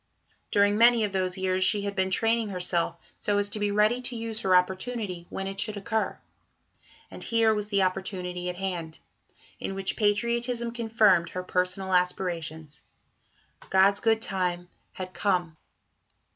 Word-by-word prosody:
During 205 +1 +3
many 235 -1 +6
of 205 - -1
those 185 -1 -1
years 185 0 0
she 205 +1 +2
had 200 0 -3
been 190 -1 +1
training 225 +3 +2
herself 180 -2 -1 0.2
so 205 -1 0
as 205 0 +1
to 210 - -4
be 205 0 0
ready 210 +4 +2
to 250 -1 -3
use 225 -1 -3
her 190 -3 +3
opportunity 185 0 -1
when 195 - -4
it 195 0 -5
should 215 -1 -2
occur. 220 +2 -2 0.9
And - - -6
here 225 -1 +3
was 210 -1 -2
the 200 -2 +2
opportunity 180 -1 -3
at 180 - -4
hand, 175 -4 -4 0.6
in 195 - -4
which 195 0 -2
patriotism 235 +3 0
confirmed 220 -7 +3
her 185 - -5
personal 185 +1 -1
aspirations. 165 -4 -1 0.9
"God's 195 +1 +4
good 225 -1 +2
time" 180 -2 -1 0.2
had 185 -1 -7
come. 180 -5 0
195 Hz, 155 wpm, -27 LUFS, 180-215 Hz, 0.9 s, many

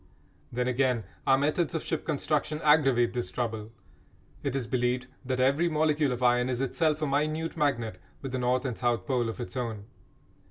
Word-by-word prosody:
Then, 125 +1 -1
again, 125 -2 +1 0.2
our 135 - +6
methods 150 +4 0
of 160 - -2
ship 160 - -3
construction 150 0 0
aggravate 135 -6 +4
this 120 -1 -2
trouble. 110 -3 -3 0.7
It 140 -2 -2
is 135 -3 -1
believed 125 0 0 0.2
that 130 -1 -2
every 140 +7 +3
molecule 155 -2 +2
of 125 0 -3
iron 125 0 +3
is 125 -1 -1
itself 155 +3 0
a - - +1
minute 155 +3 0
magnet 135 -8 0 0.2
with 135 -2 -6
a 130 - -1
north 125 +2 +1
and 125 -3 -2
south 120 -5 0
pole 120 -3 0
of 115 - -6
its 120 - -5
own. 115 -5 -3
130 Hz, 185 wpm, -28 LUFS, 120-150 Hz, 0.7 s, our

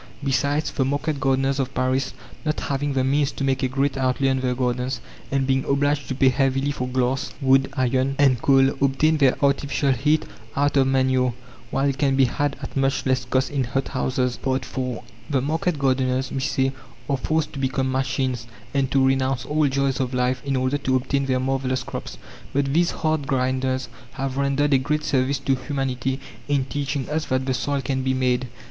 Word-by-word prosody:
Besides, 145 +2 +1
the 135 - 0
market 145 +2 -1
gardeners 135 0 +1
of 135 -1 -2
Paris, 130 +1 0 0.3
not 155 -1 -1
having 140 +1 -1
the 130 -1 +1
means 140 +2 +2
to - - -4
make 135 0 +1
a 130 - +2
great 135 +1 0
outlay 135 +1 +1
on 130 0 +1
their 125 -1 0
gardens, 125 0 -1 0.3
and 135 -1 +1
being 135 0 +1
obliged 145 0 +1
to 130 - -3
pay 130 0 +4
heavily 135 +2 +1
for 130 -3 -3
glass, 130 +2 0
wood, 135 -1 +4
iron, 130 +1 +1
and 135 -4 +4
coal, 135 -1 +5
obtain 150 +4 +3
their 135 -3 +4
artificial 140 0 +1
heat 150 +5 +2 0.3
out 145 +1 +1
of 135 -1 +4
manure, 130 -2 +2 0.3
while 135 +3 +1
it 140 -1 -1
can 140 -2 +2
be 135 0 +5
had 145 +2 -1
at - - -7
much 135 0 +1
less 130 -1 +1
cost 130 +1 0
in 140 -2 0
hothouses. 130 0 -1
IV 130 0 -1 0.6
The 140 -3 +2
market 160 +4 -1
gardeners, 130 -1 +1
we 135 - -2
say, 135 -1 +1 0.4
are 140 - +1
forced 155 +3 -1
to 140 - -6
become 130 0 0
machines 130 -2 -1 0.3
and 135 -2 +1
to 135 -1 +3
renounce 130 -2 +1
all 150 0 +2
joys 135 -1 0
of 130 -1 -1
life 125 0 +1
in 140 -1 -1
order 130 +2 0
to 130 -1 0
obtain 135 +2 0
their 130 -1 +1
marvellous 130 0 -1
crops. 90 - -7 0.4
But 140 0 +1
these 170 +2 +3
hard 155 -3 -1
grinders 130 0 0 0.3
have 135 0 -3
rendered 140 +1 +2
a 135 - +5
great 150 +3 -1
service 135 +1 +1
to 135 0 0
humanity 130 0 -2 0.3
in 140 -2 +1
teaching 140 -1 -3
us 155 0 -1
that 130 0 0
the 130 - 0
soil 140 +2 -1
can 130 0 -1
be 130 0 0
"made." 125 0 +1
135 Hz, 195 wpm, -23 LUFS, 130-140 Hz, 0.6 s, coal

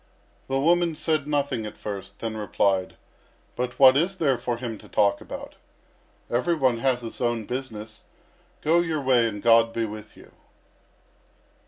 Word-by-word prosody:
The 135 0 0
woman 170 +2 +2
said 155 -2 0
nothing 140 -6 -1
at - - -10
first, 100 -2 -7
then 115 -1 -3
replied: 100 -3 0 0.6
"But 125 0 -3
what 130 -1 +8
is 175 +7 +1
there 145 -7 +2
for 120 -1 -2
him 115 -3 -5
to - - -15
talk 100 -1 +2
about? - - -8 0.7
Every 145 +9 +1
one 130 -6 +1
has 130 -1 +1
his 115 +1 -8
own 120 -2 0
business. 110 -4 -6 0.6
Go 165 +3 +4
your 165 -3 0
way, 130 -4 +3
and 105 -2 -6
God 115 0 +5
be 115 - -1
with 105 0 -9
you." - - -16
120 Hz, 160 wpm, -25 LUFS, 110-140 Hz, 0.7 s, what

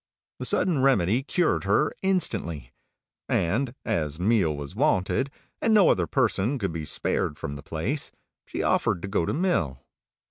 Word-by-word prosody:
The - - -2
Sudden 170 -7 +2
Remedy 120 -4 +3
cured 165 - 0
her 100 +10 +2
instantly; 105 - 0 0.6
and 120 +9 0
as 80 -8 -1
meal 90 -6 +2
was 70 +5 -7
wanted, 135 0 +1 0.3
and 225 -1 +3
no 205 -3 +6
other 90 -3 +2
person 115 - +1
could 100 -8 -2
be 80 -2 -4
spared 70 - -1
from 70 - -5
the 70 - -8
place, 85 - -3 0.4
she - - -3
offered 85 - +1
to - - -3
go 95 -4 0
to - - 0
mill. 110 - 0
100 Hz, 155 wpm, -26 LUFS, 80-140 Hz, 0.6 s, no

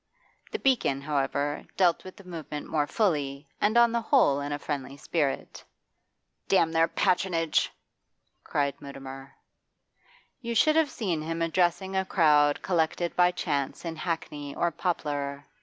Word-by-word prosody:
The 440 - -2
'Beacon,' 245 - +1
however, 145 0 -1
dealt 175 -3 +3
with 185 - -10
the 200 - -13
movement 160 -4 -7
more 150 -2 0
fully, 145 -8 0
and 215 +3 +3
on 235 -1 +6
the 235 0 0
whole 225 - +3
in 145 +1 -4
a 145 - -1
friendly 140 -2 -5
spirit. 145 -1 -2 0.8
'Damn 165 -4 +3
their 165 0 +3
patronage!' 170 -4 +1 0.7
cried 140 -1 0
Mutimer. 135 -1 -9 1.1
You 235 -1 -3
should 310 +7 +4
have 320 -2 +3
seen 180 - -2
him 165 +1 -2
addressing 175 +2 +1
a 190 - +2
crowd 150 -6 +3
collected 170 0 0
by 180 0 +5
chance 145 -4 -2
in 165 -1 -3
Hackney 155 -4 -4
or 170 - +1
Poplar. 145 -4 -3
165 Hz, 140 wpm, -27 LUFS, 145-185 Hz, 1.1 s, on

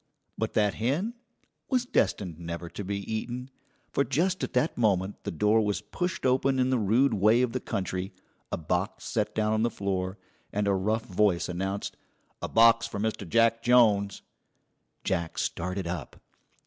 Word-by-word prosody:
But - - -2
that 105 -2 +2
hen 150 - -1 0.6
was 255 -2 +2
destined 90 - 0
never 85 0 -5
to 100 - -6
be 100 +1 -2
eaten, 120 +5 -4 0.4
for 140 - +2
just 170 +9 0
at - - -3
that 155 - +1
moment 100 -4 0
the - - -2
door 105 +6 +3
was 105 -1 -1
pushed 175 - -3
open 130 +1 +3
in 130 0 +2
the 130 - +2
rude 115 +5 +3
way 110 +4 +4
of 125 - 0
the 130 - -2
country, 95 -3 -3 0.4
a - - -1
box 90 +5 -2
set 105 -2 -1
down 110 0 +1
on 110 - +1
the 120 - +2
floor, 95 -2 -2 0.3
and 105 0 0
a 100 - +3
rough 110 +4 0
voice 95 -2 +2
announced: 95 +3 -3 0.4
"A - - -2
box 115 0 +5
for 100 - -5
Mr. 105 -4 -2
Jack 115 +1 +3
Jones." 110 -5 +4 0.8
Jack 85 -3 -1
started 90 +2 -2
up. 85 -6 -5
105 Hz, 170 wpm, -28 LUFS, 95-120 Hz, 0.8 s, box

